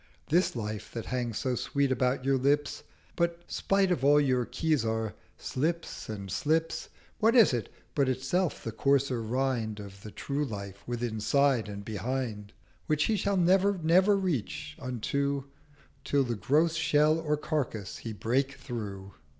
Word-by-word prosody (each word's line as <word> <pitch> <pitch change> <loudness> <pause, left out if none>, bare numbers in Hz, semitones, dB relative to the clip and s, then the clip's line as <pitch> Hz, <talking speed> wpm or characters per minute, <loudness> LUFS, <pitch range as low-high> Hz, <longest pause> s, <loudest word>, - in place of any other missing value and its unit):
This 175 0 +3
Life 110 -2 -4
that 115 -2 -4
hangs 120 -3 -2
so 130 -2 -1
sweet 140 +2 0
about 130 0 +1
your 135 -1 +3
Lips 145 +3 +1 0.3
But, 170 0 0
spite 195 -1 +1
of 165 -7 0
all 145 +1 +6
your 130 -4 +2
Khizar, 115 -9 0 0.2
slips 165 +2 -3
and 100 -3 -5
slips, 160 - 0 0.3
What 225 +3 +4
is 230 - +7
it 115 -5 -2 0.2
but 140 -3 +2
itself 135 +8 0
the 115 - -3
coarser 135 +1 +1
Rind 115 -2 -1
Of 100 -1 -10
the 110 - -8
True 140 +7 -3
Life 100 -6 -6
withinside 120 +1 +1
and 100 0 -7
behind, 110 -1 -3 0.4
Which 155 0 +2
he 220 - +2
shall 200 -1 0
never 190 +3 +4
never 185 +5 +4
reach 155 - -2
unto 140 +3 -1 0.6
Till 140 -1 +2
the 120 -2 -2
gross 155 - +2
Shell 155 -1 +3
of 150 0 +1
Carcase 120 - -2
he 115 - -6
break 130 +6 0
through?' 100 -6 -6
135 Hz, 150 wpm, -29 LUFS, 115-155 Hz, 0.6 s, is